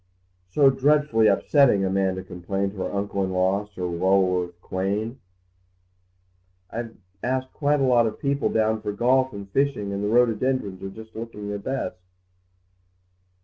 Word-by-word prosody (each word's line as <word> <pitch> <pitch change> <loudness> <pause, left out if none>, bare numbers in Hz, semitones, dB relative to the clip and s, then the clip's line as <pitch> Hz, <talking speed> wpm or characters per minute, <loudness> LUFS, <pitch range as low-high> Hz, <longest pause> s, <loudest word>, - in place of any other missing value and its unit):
"So 135 +8 +5
dreadfully 135 -4 +3
upsetting," 125 -10 +4
Amanda 95 -1 0
complained 95 +2 -3
to 100 - -14
her 95 - -2
uncle 100 -1 -2
in 95 - -1
law, 95 +3 +1
Sir 95 -3 -8
Lulworth 90 0 +1
Quayne. 100 +7 -3 1.5
"I've 115 0 -6 0.2
asked 130 +1 -2
quite 145 -1 +1
a - - +3
lot 120 -3 +4
of 110 - -5
people 140 0 0
down 110 0 +1
for 105 -1 -3
golf 130 +4 +2
and 100 -1 -8
fishing, 125 -6 0
and 100 +1 -3
the - - 0
rhododendrons 115 -3 +1
are 95 - -5
just 110 +2 -12
looking 110 -2 -6
their 100 0 -3
best." 130 -1 -3
105 Hz, 145 wpm, -24 LUFS, 95-130 Hz, 1.5 s, So